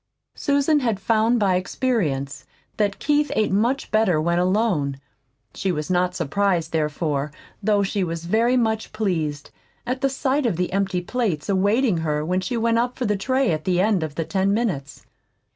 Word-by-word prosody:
Susan 285 +2 +2
had 230 -7 -1
found 225 +3 +2
by 195 -3 +2
experience 180 - -2 0.3
that 205 -2 0
Keith 295 0 +1
ate 215 - +1
much 235 +8 0
better 215 -7 +3
when 170 +2 +1
alone. 180 -7 +1 0.6
She 190 - -1
was 155 +1 -3
not 180 0 +1
surprised, 175 +1 0
therefore, 150 -2 -1 0.3
though 205 -1 +2
she 195 0 -1
was 165 -1 -4
very 230 +7 +2
much 220 -3 -1
pleased 160 -9 -2 0.3
at 255 +1 -3
sight 270 0 0
of 190 -8 -1
the 180 0 -2
empty 195 -2 0
plates 205 -5 -2
awaiting 200 +2 +2
her 150 -2 -1
when 185 +3 0
she 235 +6 -2
went 230 0 +2
up 245 +1 -1
for 255 - -2
the 210 -1 +1
tray 260 +4 +1
at 155 -1 -2
the 180 0 +1
end 200 -1 +2
of 155 -2 -4
the 165 - -2
ten 195 +2 0
minutes. 160 - -3
195 Hz, 175 wpm, -23 LUFS, 165-230 Hz, 0.6 s, better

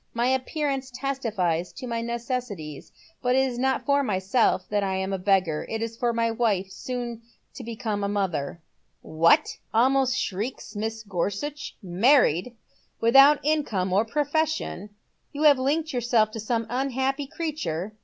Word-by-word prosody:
My 235 +1 +1
appearance 270 0 -1
testifies 225 - -2
to 265 - -8
my 230 -1 -2
necessities, 235 - -4 0.3
but 250 0 +2
it 265 0 +3
is 245 -2 -5
not 265 +1 0
for 285 0 +3
myself 190 -3 +1
that 210 -1 +1
I 190 -1 -1
am 190 +1 -2
a 190 - -2
beggar. 185 -5 +1
It 225 0 -2
is 230 0 -4
for 240 +1 0
my 230 0 0
wife. 205 -5 0
Boon 240 -2 -4 0.3
to 255 - -8
become 220 -3 -3
a - - +1
mother." 175 -7 -2 0.3
" - - -46
What? 165 +2 +3
" - - -42
almost 260 +2 +3
shrieks 210 +7 -4
Mrs. 220 +1 -4
Gorsuch. 205 - -3
" - - -37
Man 225 +10 +5
ied! 180 +11 -2 0.5
Without 275 +5 +6
income 220 -12 0
or 200 +3 +4
profession, 295 - -1 0.4
you 290 +2 -2
have 290 -3 +6
linked 300 +4 0
yourself 235 -3 +2
to 225 - -6
some 225 +1 -1
unhappy 265 +2 -1
creature 215 - -4
235 Hz, 165 wpm, -25 LUFS, 195-265 Hz, 0.5 s, Without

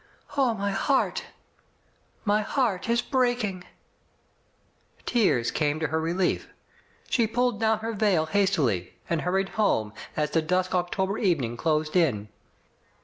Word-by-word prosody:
Oh, 260 -5 +2
my 200 -1 -1
heart 270 +7 +1
f - - -17 0.9
My 210 +1 +3
heart 220 -3 -1
is 235 +1 +2
breaking! 245 -8 0 1.4
Tears 190 - +2
came 150 0 0
to 160 - -1
her 160 0 0
relief. 175 +3 0 0.6
She 230 -3 +2
pulled 245 -1 0
down 220 -1 +2
her 225 +1 -3
veil 200 -7 +2
hastily, 155 - +1
and 165 -2 0
hurried 190 +2 0
home, 110 - +1 0.2
as 150 -1 0
the 165 - +2
dusk 180 +3 0
Octo 180 +1 0
ber 200 +3 -3
evening 145 - +1
closed 155 +3 0
in. 110 - +2
190 Hz, 140 wpm, -26 LUFS, 155-220 Hz, 1.4 s, My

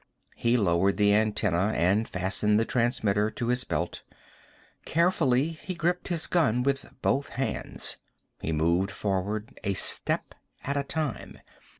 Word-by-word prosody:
He 120 +1 +2
lowered 95 -1 +2
the 105 -1 +4
antenna 105 -2 +1
and 100 +6 +2
fastened 100 +3 +1
the 115 - +1
transmitter 110 -4 +1
to 120 +2 -4
his 125 +1 +1
belt. - - -3 0.8
Carefully, 160 -5 +2
he 180 +3 -7
gripped 175 +1 -1
his 170 -3 -1
gun 125 -9 +2
with 140 +1 -1
both 140 +1 +1
hands. 135 +2 -2 0.4
He 80 - -3
moved 85 +5 +1
forward, 105 +2 -3
a 100 -2 -1
step - - +2 0.3
at 140 - -2
a 140 - 0
time. 150 -2 -4
110 Hz, 135 wpm, -27 LUFS, 100-140 Hz, 0.8 s, the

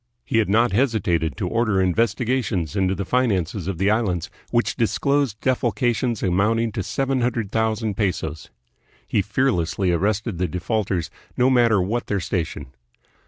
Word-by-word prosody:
He 115 - +1
had 105 - +1
not 115 +4 +3
hesitated 95 - +1
to 95 - -2
order 110 -1 +1
investigations 110 - 0
into 95 -1 +1
the 100 - -3
finances 100 -7 0
of 95 -3 -2
the 95 +4 +2
Islands, 95 -6 0 0.2
which 120 0 +1
disclosed 130 0 0
defalcations 120 -2 0
amounting 110 +5 +1
to 110 -2 -3
seven 135 +6 -1
hundred 115 -4 -1
thousand 110 -2 0
pesos. 80 -7 -2 0.6
He 105 - +1
fear 130 +7 +1
lessly 90 0 0
arrested 100 +1 -1
the 90 - +1
defaulters, 90 +1 -2 0.3
no 125 +1 +4
matter 120 -5 +4
what 110 +6 -1
their 100 - 0
station. 85 -6 -4
105 Hz, 150 wpm, -22 LUFS, 95-120 Hz, 0.6 s, no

